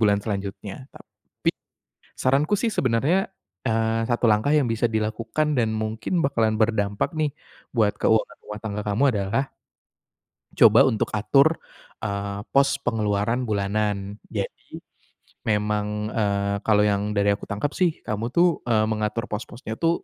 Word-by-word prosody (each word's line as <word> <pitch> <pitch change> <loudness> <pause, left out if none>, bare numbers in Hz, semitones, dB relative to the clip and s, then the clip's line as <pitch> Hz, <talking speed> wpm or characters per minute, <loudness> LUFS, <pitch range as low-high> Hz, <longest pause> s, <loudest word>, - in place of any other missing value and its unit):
bulan 105 -2 +4
selanjutnya, 100 +3 -5
tapi - - -5 0.7
saranku 140 +7 +2
sih 230 +3 0
sebenarnya, 135 +11 +1 0.4
eee, 115 0 +1
satu 120 0 +2
langkah 110 +7 +3
yang 145 -5 +3
bisa 115 +1 +1
dilakukan 115 +7 -1
dan 110 -2 +1
mungkin 110 +11 -1
bakalan 115 -6 +1
berdampak 105 - 0
nih 150 -3 0 0.4
buat 110 -4 +2
keuangan 110 0 +1
rumah 105 0 -7
tangga 105 -1 -4
kamu 105 +5 0
adalah 105 +4 0 1.1
coba - - +7
untuk 110 - 0
atur, 135 +10 +4 0.5
eee, 100 -1 -3
pos 140 0 +4
pengeluaran 110 +2 0
bulanan. 100 0 -1
Jadi, - - -6 0.7
memang, 105 0 -1
eee, 100 -2 0
kalau 105 -1 +4
yang 105 0 0
dari 100 0 +3
aku 100 - -7
tangkep 105 +8 -2
sih 180 -2 +2
kamu 110 +3 -2
tuh, 170 +5 +2
eee, 110 -2 +3
mengatur 110 +1 -1
pos-posnya 115 +2 -5
tuh 165 0 +1
110 Hz, 135 wpm, -24 LUFS, 105-125 Hz, 1.1 s, coba